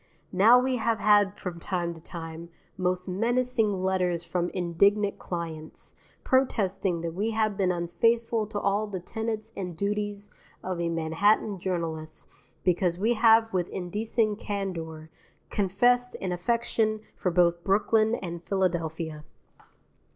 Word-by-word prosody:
Now 210 Hz, +6 st, +7 dB
we 255 Hz, 0 st, +1 dB
have 230 Hz, 0 st, +1 dB
had 205 Hz, -1 st, +4 dB
from 175 Hz, -2 st, -6 dB
time 175 Hz, -1 st, -2 dB
to 165 Hz, -, -13 dB
time, 165 Hz, 0 st, -8 dB, 0.3 s
most 180 Hz, 0 st, -1 dB
menacing 225 Hz, 0 st, +1 dB
letters 180 Hz, -2 st, 0 dB
from 175 Hz, 0 st, -1 dB
indignant 200 Hz, +4 st, +1 dB
clients, 165 Hz, -3 st, -6 dB, 0.3 s
protesting 195 Hz, -9 st, +1 dB
that 165 Hz, -1 st, -4 dB
we 205 Hz, +6 st, -1 dB
have 215 Hz, -2 st, +1 dB
been 190 Hz, -2 st, +1 dB
unfaithful 225 Hz, +6 st, +1 dB
to 205 Hz, -1 st, -3 dB
all 205 Hz, +2 st, 0 dB
the 195 Hz, -3 st, -4 dB
tenets 220 Hz, +3 st, -4 dB
and 180 Hz, -4 st, -5 dB
duties 205 Hz, +1 st, -2 dB, 0.3 s
of 180 Hz, -2 st, -3 dB
a 170 Hz, -, 0 dB
Manhattan 175 Hz, +5 st, +1 dB
journalist 165 Hz, -4 st, -4 dB, 0.4 s
because 175 Hz, -1 st, +1 dB
we 220 Hz, +5 st, +2 dB
have 225 Hz, -1 st, +5 dB
with 180 Hz, -2 st, 0 dB
indecent 210 Hz, +3 st, -1 dB
candour 165 Hz, -7 st, -5 dB, 0.4 s
confessed 245 Hz, +6 st, +2 dB
an 185 Hz, -, -3 dB
affection 215 Hz, +3 st, 0 dB
for 185 Hz, -, -1 dB
both 170 Hz, -1 st, +2 dB
Brooklyn 215 Hz, +3 st, +3 dB
and 170 Hz, -5 st, -6 dB
Philadelphia. 165 Hz, -5 st, -2 dB
190 Hz, 130 wpm, -27 LUFS, 170-215 Hz, 0.4 s, Now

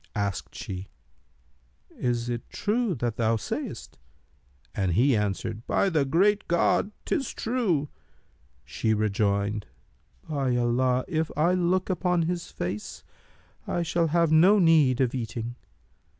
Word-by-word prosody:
Asked 100 Hz, -4 st, -3 dB
she, 95 Hz, 0 st, -6 dB, 1.0 s
'Is 120 Hz, -1 st, -2 dB
it 120 Hz, -1 st, -4 dB
true 215 Hz, -2 st, 0 dB
that 120 Hz, -3 st, -2 dB
thou 115 Hz, -1 st, +2 dB
sayst?'; 110 Hz, -, -5 dB, 0.7 s
and 95 Hz, -4 st, 0 dB
he 125 Hz, +7 st, +4 dB
answered, 105 Hz, +1 st, -2 dB
'By 195 Hz, -, +2 dB
the 155 Hz, -6 st, +1 dB
Great 200 Hz, +9 st, +2 dB
God, 175 Hz, +3 st, +2 dB, 0.2 s
'tis 275 Hz, -8 st, -1 dB
true!' 215 Hz, -, 0 dB, 0.8 s
She 110 Hz, -1 st, 0 dB
rejoined, 105 Hz, 0 st, 0 dB, 0.6 s
'By 135 Hz, -5 st, 0 dB
Allah, 125 Hz, +1 st, +1 dB
if 160 Hz, -2 st, -1 dB
I 170 Hz, +4 st, +3 dB
look 185 Hz, +1 st, +1 dB
upon 180 Hz, -2 st, +1 dB
his 175 Hz, +1 st, -3 dB
face, 95 Hz, +4 st, -5 dB, 0.6 s
I 175 Hz, -, -1 dB
shall 170 Hz, 0 st, +1 dB
have 165 Hz, 0 st, +2 dB
no 180 Hz, +7 st, +6 dB
need 155 Hz, -8 st, +4 dB
of 130 Hz, -2 st, +1 dB
eating!' 120 Hz, -1 st, -4 dB
135 Hz, 125 wpm, -26 LUFS, 115-175 Hz, 1.0 s, no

